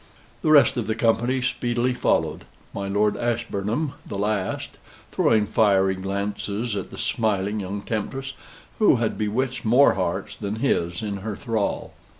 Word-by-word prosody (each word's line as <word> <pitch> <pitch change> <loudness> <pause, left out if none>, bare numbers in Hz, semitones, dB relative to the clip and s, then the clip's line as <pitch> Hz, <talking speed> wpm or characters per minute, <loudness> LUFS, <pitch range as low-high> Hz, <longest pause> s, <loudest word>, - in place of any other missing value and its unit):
The - - +1
rest 145 -3 +6
of 115 -4 -2
the 110 - 0
company 120 +3 +1
speedily 120 0 0
followed, 125 - 0 0.3
my 100 0 -4
Lord 105 +1 +2
Ashburnham 120 +3 -1
the 100 - -6
last, 100 -1 -2 0.3
throwing 110 -2 +3
fiery 100 -3 +3
glances 100 +3 -3
at 100 - -4
the - - -10
smiling 105 -2 0
young 100 +1 -4
temptress, 135 +6 -3 0.5
who 210 -9 +6
had 115 -2 0
bewitched 120 +4 -1
more 125 +6 +5
hearts 95 0 -2
than 105 0 -4
his 85 -7 0
in 100 -2 -3
her 105 +2 -5
thrall. 110 -2 -2
110 Hz, 150 wpm, -24 LUFS, 100-120 Hz, 0.5 s, rest